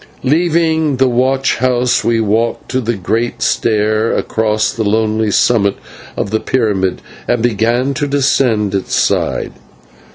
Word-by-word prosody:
Leaving 160 0 +1
the 130 0 +3
watch 130 +2 +1
house 125 -1 +1
we 115 -1 +1
walked 110 +2 -1
to 130 0 0
the 120 0 -2
great 110 +5 -2
stair 110 0 +1
across 110 -1 0
the 110 - -2
lonely 110 +1 0
summit 100 -1 +2 0.4
of 100 - -3
the 110 - +1
pyramid 105 -8 -1 0.2
and 120 -2 0
began 120 +4 +1
to 145 +1 -2
descend 130 -7 +1
its 95 -1 -2
side. - - 0
115 Hz, 135 wpm, -15 LUFS, 110-130 Hz, 0.4 s, the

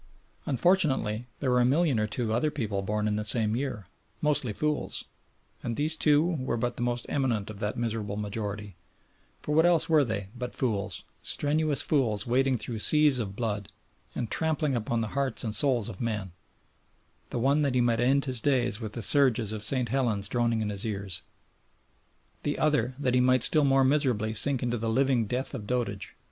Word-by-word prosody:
Unfortunately 130 - +2
there 130 -3 +1
were 125 - +3
a - - +4
million 140 0 +2
or 105 - 0
two 105 +4 -3
of 110 - -1
other 120 +7 +1
people 110 -9 -3
born 105 +2 -1
in 105 0 0
the 105 - -2
same 110 +1 +1
year, 125 -6 -3 0.3
"mostly 145 -6 0
fools," 150 +7 -2 0.6
and 115 -1 -3
these 155 +2 +1
two 155 +3 +2
were 120 -2 -1
but 120 +1 -2
the - - -6
most 120 0 -1
eminent 115 -7 -1
of 100 - -11
that 105 0 -3
miserable 110 -3 -3
majority, 105 -2 -5 0.7
for 150 - -2
what 160 +2 +5
else 175 -2 +4
were 155 -3 +4
they 100 -5 -4
but 125 0 -5
fools, 105 -6 -2 0.2
strenuous 150 0 0
fools 115 -9 +1
wading 130 +2 +2
through 115 -1 -5
seas 150 +1 +5
of 100 -4 -4
blood, 105 -4 -3 0.4
and 120 - -3
trampling 155 -3 0
upon 115 0 -1
the 110 - -3
hearts 140 -1 -1
and 110 -3 -2
souls 120 -1 +2
of 105 -5 -7
men, 105 -5 -3 1.0
the - - -4
one 140 +5 +2
that 140 -3 0
he - - +3
might 120 -1 +2
end 135 +3 +2
his 130 -4 +1
days 125 -5 +1
with 110 -2 -6
the 115 - -4
surges 125 -6 +3
of 110 -1 -5
St. 125 +2 +1
Helena 120 -7 0
droning 115 +1 0
in 105 - -2
his 100 +1 -2
ears, 100 -5 -4 1.2
the 145 - -2
other 140 -5 +1
that 130 -3 0
he 125 - +4
might 130 -1 +4
still 155 - +4
more 135 0 +4
miserably 130 -6 +1
sink 130 +4 +1
into 120 -1 -1
the 115 +1 -2
living 125 -1 +2
death 125 +6 -3
of 110 -6 -6
dotage? 105 -6 -3
120 Hz, 195 wpm, -28 LUFS, 110-135 Hz, 1.2 s, what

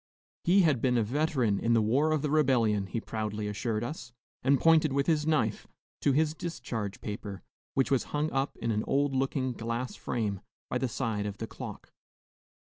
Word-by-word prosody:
He 190 +3 +5
had 145 -8 +3
been 125 -2 +2
a 115 - +3
veteran 125 -4 +1
in 115 - +2
the 115 - +5
War 140 +9 +2
of 155 -2 +1
the 150 - 0
Rebellion, 120 -9 +3
he 115 - -2
proudly 105 -2 -3
assured 110 +1 -2
us, 130 -1 -6 0.3
and 135 +1 +3
pointed 160 -2 +5
with 140 0 +2
his 155 -2 +1
knife 120 -9 +1 0.3
to 140 - +2
his 155 +2 +2
discharge 115 - -5
paper, 105 -2 -6 0.3
which 135 +1 +2
was 135 - +2
hung 150 +1 -1
up 135 +1 -1
in 115 - -1
an 110 0 0
old 140 0 +2
looking 135 0 0
glass 115 +2 -3
frame 105 -5 -2 0.3
by - - +1
the 130 - 0
side 110 -4 -2
of 100 -1 -5
the 115 - -4
clock. - - -9
125 Hz, 190 wpm, -30 LUFS, 110-145 Hz, 0.3 s, He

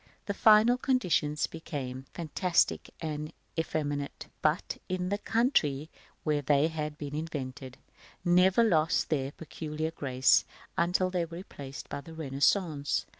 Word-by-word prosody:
The 200 - -1
final 220 +4 +6
conditions 175 - +1
became 135 -5 -6
fantastic 170 +1 +1
and 155 -1 -4 0.2
effeminate, 145 -3 -2
but, 155 +2 0
in 180 0 -1
the 205 +1 -1
country 165 - +1 0.3
where 150 -2 +1
they 145 +2 +3
had 150 -2 -4
been 145 -1 -6
invented, 135 -5 -5 0.5
never 180 +5 +5
lost 165 -9 +2
their 135 -3 0
peculiar 155 0 -5
grace 130 -4 +3 0.3
until 180 +1 +2
they 180 -2 0
were 165 0 -9
replaced 140 -7 -8
by 140 - -5
the 160 +3 -11
Renaissance. 145 +1 +1
155 Hz, 125 wpm, -30 LUFS, 145-180 Hz, 0.5 s, final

